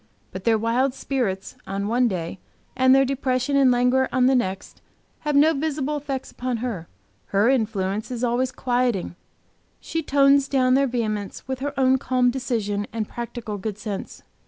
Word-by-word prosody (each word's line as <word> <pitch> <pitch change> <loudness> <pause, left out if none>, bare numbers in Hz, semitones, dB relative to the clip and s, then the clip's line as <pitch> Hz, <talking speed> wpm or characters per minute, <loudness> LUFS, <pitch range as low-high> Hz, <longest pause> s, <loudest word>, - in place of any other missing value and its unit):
But 185 0 -8
their 225 -1 +4
wild 245 +4 +1
spirits 205 -11 -2
on 200 +1 -2
one 245 +3 +2
day, 180 -3 -4 0.4
and 260 0 +5
their 270 0 +5
depression 265 0 0
and 275 -2 +5
languor 250 +1 +3
on 255 -1 +3
the 265 - +4
next, 195 -7 -2 0.4
have 300 -1 -2
no 305 +3 +5
visible 300 -1 -2
effect 275 -2 -5
upon 250 -1 -3
her. 220 -8 -4 0.4
Her 200 +4 +3
influence 215 -4 0
is 250 -1 -4
always 250 +2 +1
quieting; 245 -9 -1 0.6
she 325 - -3
tones 280 -1 +4
down 255 -2 +2
their 275 +1 +4
vehemence 215 -5 -3
with 265 -1 -3
her 285 0 -4
own 260 0 +4
calm 250 -2 +2
decision 220 -5 -2
and 220 -2 -3
practical 235 -3 -6
good 205 +1 -4
sense. 210 -2 -6
250 Hz, 165 wpm, -23 LUFS, 215-265 Hz, 0.6 s, and